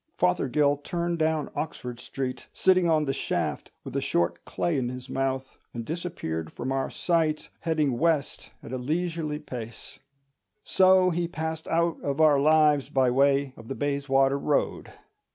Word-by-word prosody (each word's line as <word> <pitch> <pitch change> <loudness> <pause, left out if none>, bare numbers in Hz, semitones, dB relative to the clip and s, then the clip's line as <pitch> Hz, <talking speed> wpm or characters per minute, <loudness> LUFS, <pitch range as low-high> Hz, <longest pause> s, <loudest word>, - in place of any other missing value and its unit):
Fothergill 145 -5 +2
turned 170 +3 -2
down 155 -2 0
Oxford 125 -6 -5
Street, 130 0 -5
sitting 185 -2 +3
on 155 -2 +3
the 135 - 0
shaft - - -2
with - - -8
a - - +1
short 85 0 0
clay 170 - -1
in 125 -3 0
his 125 +1 -8
mouth, 135 0 -2 0.2
and 115 -1 -4
disappeared 155 - -4
from 130 - -4
our 135 0 -1
sight, 160 -3 0
heading 155 -7 0
west 160 -5 0
at 125 - -8
a 130 - -2
leisurely 160 +2 -2
pace. 120 -7 -8 0.6
So 185 -1 +5
he 170 0 -1
passed 160 -1 -4
out 170 0 +1
of 140 +1 -2
our 150 -3 +6
lives 150 -1 +4
by 130 -2 +2
way 140 +1 +3
of 115 - -13
the 135 - -4
Bayswater 140 -1 +1
Road. 145 +1 -1
145 Hz, 155 wpm, -27 LUFS, 130-165 Hz, 0.6 s, our